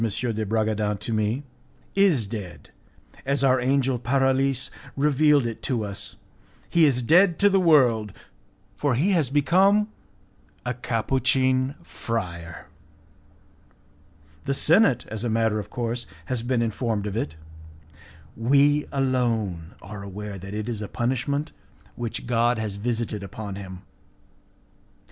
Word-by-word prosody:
de 110 0 -1
Bragadin 110 -1 0
to 115 - -4
me, 110 +5 0 0.5
"is 185 - +3
dead, 100 -4 -8 0.5
as 140 +1 0
our 130 -1 +4
angel 130 -1 +1
Paralis 135 +1 +1 0.3
revealed 145 -1 +4
it 115 -2 -4
to 120 -6 -1
us; 100 -1 -6 0.6
he 170 -2 +5
is 125 -4 +2
dead 175 +6 +5
to 205 0 +4
the 195 - +4
world, 125 - +4 0.6
for 145 -4 0
he 165 - +2
has 160 -9 +2
become 190 +9 +3 0.8
a 125 - -1
Capuchin 130 +2 +1
friar. 85 -7 -5 1.8
The 140 - 0
senate, 165 - +4
as 110 0 -5
a 120 - 0
matter 110 -1 +1
of 105 0 -7
course, 120 0 -3 0.2
has 125 +4 -2
been 120 0 0
informed 110 -2 -2
of 105 -1 -4
it. 80 -9 -3 1.0
We 140 +5 +3
alone 115 - -1
are 100 0 -8
aware 100 0 -7
that 100 +3 -7
it 105 +1 -3
is 115 -3 -3
a 105 - -4
punishment 130 +6 -1 0.4
which 120 -2 -4
God 120 0 +2
has 105 -3 -3
visited 115 -1 -2
upon 100 +1 -7
him. 95 -1 -9
120 Hz, 130 wpm, -25 LUFS, 105-135 Hz, 1.8 s, he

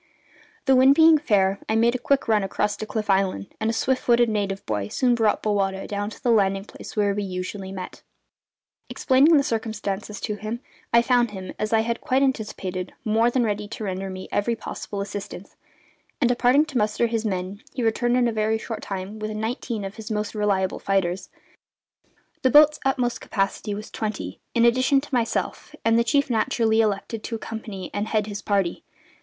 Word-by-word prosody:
The 265 -1 +5
wind 265 +2 +6
being 320 0 +7
fair, 200 -7 +2
I 220 - +2
made 230 +1 +4
a 255 - -2
quick 275 +1 +1
run 215 -2 +3
across 195 +2 -1
to 215 - -5
Cliff 215 -1 -3
Island; 190 - 0
and 220 - 0
a - - 0
swift 260 +3 0
footed 240 -1 +3
native 200 -2 -2
boy 105 -2 -2
soon 245 - +1
brought 225 -3 +1
Bowata 195 -2 0
down 205 0 -3
to 215 - -13
the 245 - +3
landing 195 -3 +2
place - - -11
where 205 -2 +2
we 205 - -2
usually 190 0 -5
met. 185 -1 -7 0.9
Explaining 285 +5 +4
the 280 - +3
circumstances 215 -3 -3
to 215 - -2
him, 215 +3 -4 0.3
I 235 0 +5
found 240 -1 +3
him, 190 -2 -7
as 215 - -2
I 225 -1 +4
had 235 +1 -2
quite 265 +1 +2
anticipated, 200 -8 -2
more 225 +2 +3
than 245 0 +1
ready 210 -1 -2
to 220 +1 -7
render 190 -1 -3
me 185 0 -7
every 230 +3 0
possible 205 -2 -6
assistance; 200 -1 -7 0.6
and, 250 - +3
departing 245 +4 +4
to 270 -5 -2
muster 210 +2 +1
his 230 -1 -1
men, 190 -1 -3
he 250 - -3
returned 240 +2 +2
in 245 -1 +3
a - - 0
very 220 0 +1
short 220 -1 -6
time 195 +2 -6
with 215 0 -3
nineteen 220 0 -3
of 195 +3 -7
his 220 -1 -8
most 210 -1 -2
reliable 200 -3 0
fighters 190 -2 -1 1.1
the 260 - +3
boat's 300 +2 +6
utmost 255 -3 0
capacity 200 +1 -2
was 210 +1 -8
twenty, 215 -2 -4 0.2
in 235 0 +4
addition 255 +3 +4
to 280 +1 -11
myself, 240 +5 -1
and 225 0 +4
the - - +3
chief 280 +3 +2
naturally 225 -1 +2
elected 215 +1 -2
to 230 - -4
accompany 220 -4 -6
and 205 +1 -2
head 215 -2 +1
his 205 -1 -6
party. 195 -4 0
215 Hz, 195 wpm, -24 LUFS, 200-240 Hz, 1.1 s, being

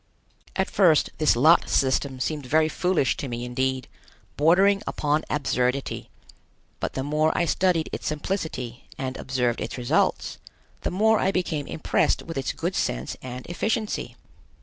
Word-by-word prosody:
At 190 - +1
first 175 -6 +4
this 155 -5 +4
lot 155 +8 +5
system 130 0 +1
seemed 145 0 -2
very 155 +4 +3
foolish 175 -2 +1
to 140 - -4
me 120 0 -4
indeed, 130 +1 -1 0.5
bordering 190 +6 +4
upon 150 +1 0
absurdity, 135 -2 -1 0.7
but - - -3
the 130 - -2
more 155 +2 +2
I 175 - +2
studied 170 0 +1
its - - -4
simplicity 150 - -3
and 130 -1 -3
observed 125 -2 -1
its - - -4
results, 120 -1 0 0.4
the - - -1
more 220 +4 +3
I 190 - +2
became 160 -6 -2
impressed - - 0
with 165 - -7
its 135 -1 -1
good - - -3
sense - - -1
and 125 0 -7
efficiency. 215 +5 -2
150 Hz, 150 wpm, -25 LUFS, 130-175 Hz, 0.7 s, lot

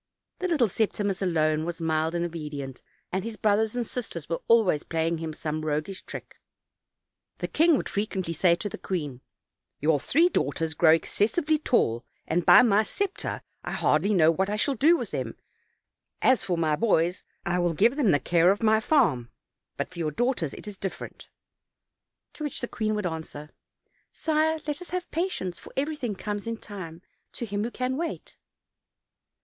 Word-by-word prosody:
The 370 - -1
little 300 -10 +3
Septimus 200 -1 -1
alone 155 -4 +1
was 175 +1 -4
mild 160 0 0
and 170 0 0
obedient, 150 -5 -6 0.3
and 190 +1 -1
his 225 -1 -5
brothers 215 +2 +2
and 245 -1 -1
sisters 205 - -5
were 165 - -2
always 220 -10 +4
playing 165 0 -1
him 160 -1 -4
some 155 0 -4
roguish 155 +5 -2
trick. - - -9 1.0
The - - -3
king 325 -1 +4
would - - -3
frequently 195 -4 -2
say 170 +2 +4
to 205 - -4
the 200 - -7
queen; 145 -9 -4 0.6
"Your 150 0 +2
three 325 - +3
daughters 160 - -1
grow 160 +1 +6
excessively 285 - +1
tall, 120 - +1 0.2
and 170 +1 -1
by - - +9
my 215 -3 +4
scepter, 395 - -3 0.2
I - - -4
hardly 200 - +2
know 165 -5 +5
what 190 +4 0
I 210 - 0
shall 275 +6 +1
do 310 +8 +4
with - - -5
them; - - -3 0.9
as 260 -5 +4
for 180 -3 0
my 155 -2 +2
boys, 180 -3 +1 0.2
I 180 -1 +1
will 175 -2 +1
give 235 - +4
them 280 -8 +2
the 145 - +4
care 170 +5 +3
of 200 +3 +1
my 220 0 +5
farm; 170 - +2 0.5
but - - -3
for 180 - -9
your 160 -2 0
daughters, 210 - -1
it - - -10
is 205 -2 -8
different." 195 - -6 1.0
To 305 - -7
which 295 - -3
the 245 - -3
queen 215 -2 -1
would 210 -2 -2
answer: 160 -3 -5 0.6
"Sire, 315 0 +1
let 295 +2 -3
us 360 - -9
have 365 -1 -4
patience; 250 - -2
for - - -12
everything 270 -6 -2
comes 205 +2 -4
in 230 0 -2
time 185 -6 -9 0.3
to 235 - -5
him 205 -1 -2
who 230 - -2
can 255 +2 -2
wait." 335 +1 -5
195 Hz, 180 wpm, -27 LUFS, 160-240 Hz, 1.0 s, by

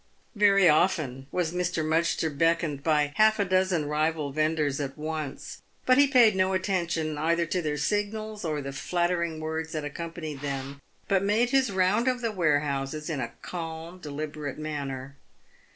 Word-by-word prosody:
Very 200 -3 +5
often 150 -5 +2
was 175 -2 -1
Mr. 180 -3 -1
Mudgster 160 -1 +1
beckoned 165 -2 +1
by 150 -1 +1
half 215 0 +5
a 200 - +1
dozen 185 -4 +1
rival 150 0 0
vendors 155 -1 0
at 135 -1 -5
once, 155 -2 -5 0.2
but 255 +1 +5
he 285 - +7
paid 240 -6 +5
no 190 0 +2
attention 170 -5 -1
either 170 +2 +1
to 180 +2 -1
their 150 -2 -2
signals, 210 +4 -2
or 155 -3 -2
the 135 0 -5
flattering 170 +2 -1
words 160 +1 -4
that 155 -2 -3
ac 145 - -6
companied 165 -4 -6
them, 140 0 -5 0.3
but 195 -2 +2
made 220 +5 +2
his 265 -4 +3
round 190 +5 +2
of 250 -1 +1
the 230 -2 -1
warehouses 150 -3 0
in 145 - -2
a 120 - -4
calm, 165 0 -6
deliberate 150 -2 -5
manner. 140 -3 -5
160 Hz, 165 wpm, -27 LUFS, 150-185 Hz, 0.3 s, he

